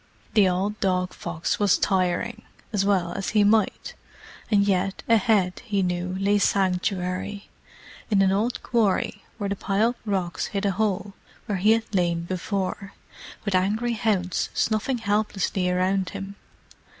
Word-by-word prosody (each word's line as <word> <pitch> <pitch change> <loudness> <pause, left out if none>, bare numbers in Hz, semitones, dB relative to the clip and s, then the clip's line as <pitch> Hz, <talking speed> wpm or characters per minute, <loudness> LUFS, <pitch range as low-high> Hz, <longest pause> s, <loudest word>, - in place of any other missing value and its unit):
The 205 -4 +5
old 195 +4 -1
dog 185 -2 0
fox 170 -1 -3
was 205 -3 +4
tiring, 190 +5 0 0.3
as 200 -2 +2
well 195 -2 0
he 210 +2 +2
might, 210 0 +2 0.6
and 200 -2 +3
yet, 195 0 0
ahead, 215 -5 +3
he 205 -5 0
knew, 180 +1 -2
lay 205 +1 +2
sanctuary, 190 +1 0 0.6
in 200 -3 +4
an 190 - +3
old 220 +5 -1
quarry 225 -5 +1 0.2
where 205 -2 -2
the - - 0
piled 210 +5 +1
rocks 190 -5 -2
hid 200 0 -3
a 200 - +3
hole 200 -1 -1 0.3
where 200 -3 -2
he 210 +4 +5
had 225 -1 -2
lain 175 -3 +1
before, 190 +2 -3 0.5
with 200 - -1
angry 210 +6 +1
hounds 200 -5 0
snuffing 220 +4 0
helplessly 205 -4 0
around 185 +1 +1
him. 195 0 -6
195 Hz, 140 wpm, -25 LUFS, 185-210 Hz, 0.6 s, The